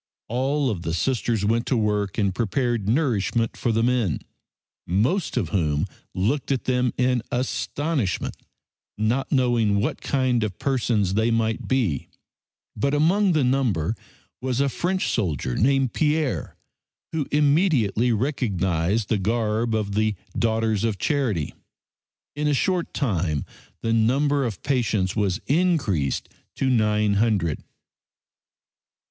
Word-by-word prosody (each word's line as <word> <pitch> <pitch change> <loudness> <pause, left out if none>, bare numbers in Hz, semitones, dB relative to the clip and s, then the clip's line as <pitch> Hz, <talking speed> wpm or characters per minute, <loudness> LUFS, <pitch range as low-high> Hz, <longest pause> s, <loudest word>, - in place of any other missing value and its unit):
All 135 +3 0
of 95 -5 -4
the 80 -1 -2
Sisters 115 0 0
went 115 +3 +1
to 130 - +1
work 105 -2 0
and 100 -4 +1
prepared 115 -1 -1
nourishment 115 -4 +1
for 120 - -1
the 115 +1 +1
men, 120 -8 +1 0.7
most 125 - 0
of 95 -10 0
whom 75 -5 +1 0.3
looked 120 +10 0
at 135 - 0
them 125 -1 +1
in 125 -1 +2
astonishment, 125 - -1 0.6
not 115 +6 0
knowing 120 -6 +2
what 110 - -2
kind 130 -4 +1
of 100 -4 -3
persons 115 -8 0
they 110 +3 +2
might 115 -1 0
be, 115 - 0 0.7
but 140 +7 0
among 180 +6 +3
the 155 -3 +2
number 120 - +1 0.5
was 130 -1 -1
a 140 0 +2
French 185 +8 -1
soldier 75 - -1
named 135 - +2
Pierre, 150 - 0 0.6
who 155 -4 -2
immediately 140 - +3
recognized 100 - 0
the 110 -3 +1
garb 110 +2 0
of 105 -2 -1
the 110 0 +1 0.2
"Daughters 110 -2 +1
of 110 -3 0
Charity." 115 - -1 0.8
In 150 0 -1
a 145 - +2
short 180 +4 0
time 90 - 0 0.4
the 115 - +1
number 135 +5 +2
of 110 -6 -5
patients 110 -8 0
was 100 -3 0
increased 140 - +1 0.3
to 130 -1 +1
nine 105 -3 +2
hundred. 95 -9 +1
115 Hz, 130 wpm, -24 LUFS, 100-135 Hz, 0.8 s, among